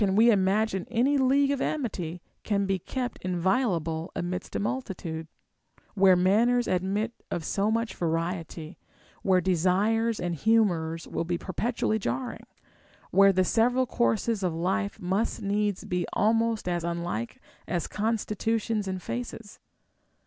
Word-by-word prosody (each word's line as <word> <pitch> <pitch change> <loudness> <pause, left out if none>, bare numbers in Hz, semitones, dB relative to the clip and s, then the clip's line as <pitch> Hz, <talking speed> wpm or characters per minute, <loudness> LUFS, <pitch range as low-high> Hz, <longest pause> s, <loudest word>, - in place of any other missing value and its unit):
473 205 +2 +4
we 235 - +7
imagine 195 0 +1
any 245 +5 +2
league 275 +1 +3
of 280 -1 -1
amity 180 - -3 0.2
can 200 -2 0
be 195 -1 0
kept 250 +6 -4
inviolable 175 -3 0
amidst 180 +2 -4
a - - +1
multitude, 185 -8 -4 0.7
where 195 -2 +6
manners 225 +7 +3
admit 195 +5 0 0.2
of 165 - -3
so 200 +4 0
much 230 +1 0
vari 170 +2 -1
ety, 160 0 -10 0.4
where 190 -2 +3
desires 195 +6 +1
and 175 -1 -2
humors 170 -5 +1
will - - -2
be 175 +1 -1
perpetually 220 +4 -1
jarring, 120 - -4 0.6
where 195 +1 +6
the 185 -1 +2
several 245 +6 +3
courses 230 -3 0
of 180 -3 -1
life 100 - -1
must 195 +5 -1
needs 205 -1 0
be 180 -1 -1
almost 225 0 +1
as 175 -1 -1
unlike 170 -9 -3 0.3
as 175 -3 -1
constitutions 220 0 -1
and 185 -1 -4
faces'? 230 -3 -6
195 Hz, 135 wpm, -27 LUFS, 175-225 Hz, 0.7 s, we